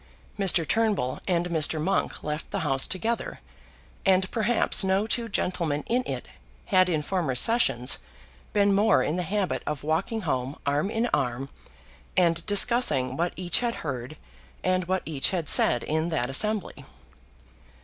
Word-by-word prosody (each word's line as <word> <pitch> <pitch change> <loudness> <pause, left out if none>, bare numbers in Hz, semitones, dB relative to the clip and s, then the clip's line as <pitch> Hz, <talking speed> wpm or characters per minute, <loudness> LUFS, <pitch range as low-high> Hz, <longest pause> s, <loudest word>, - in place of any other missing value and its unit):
Mr. 185 -5 +3
Turnbull 210 - 0
and 175 -2 0
Mr. 160 -1 +1
Monk 190 +6 -1
left 150 +1 -4
the - - -3
House 135 -4 +3
together, 225 +5 -3 0.6
and 190 -1 +2
perhaps 230 -2 +2
no 190 +2 +1
two 230 +1 -1
gentlemen 170 -7 -1
in 245 +2 +1
it - - -5 0.4
had 185 -2 +3
in 155 -3 -1
former 165 -7 -2
sessions 125 - +3 0.5
been 200 -1 +3
more 205 +3 +3
in 155 - -1
the 180 - -1
habit 195 +2 -2
of 150 -2 -3
walking 170 +9 -1
home 130 -4 -3
arm 145 +7 0
in 225 +2 -1
arm 135 0 -1 0.7
and 170 -2 +3
discussing 205 - +3
what 170 +4 -1
each 175 -1 0
had 240 -1 -1
heard 130 +1 -5 0.5
and 185 -1 +1
what 185 +1 -1
each 145 -4 -1
had 175 -5 -3
said 120 -3 +4
in 160 +2 -1
that 135 -6 -2
assembly. 210 +8 0
175 Hz, 150 wpm, -26 LUFS, 150-205 Hz, 0.7 s, said